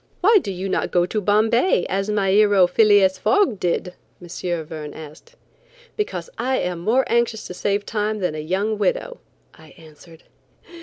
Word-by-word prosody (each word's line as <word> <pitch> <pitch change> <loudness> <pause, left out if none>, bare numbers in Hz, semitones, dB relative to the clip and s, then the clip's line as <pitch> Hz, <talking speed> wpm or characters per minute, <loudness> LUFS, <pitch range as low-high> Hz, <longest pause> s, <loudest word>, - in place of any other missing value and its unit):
"Why 420 +3 +5
do 200 - -5
you 185 +1 -5
not - - -1
go 175 -1 +2
to 210 +4 -3
Bombay 220 - +2
as 195 +2 -2
my 200 -2 +1
hero 205 -2 +5
Phileas 195 0 +3
Fogg 390 - +2
did?" 180 +1 -2 0.3
M. 175 - -12 0.4
Verne 155 -2 -8
asked. 160 - -13 0.6
"Because 420 +2 -4
I 260 +1 0
am 180 -1 -3
more 230 +9 +2
anxious 235 -2 0
to - - -7
save 200 +2 -2
time 215 -1 -2
than 180 -6 -2
a 155 - -5
young 195 +7 -2
widow," - - -1 0.3
I 160 -3 -18
answered. 160 +1 -17
200 Hz, 165 wpm, -21 LUFS, 180-220 Hz, 0.6 s, Why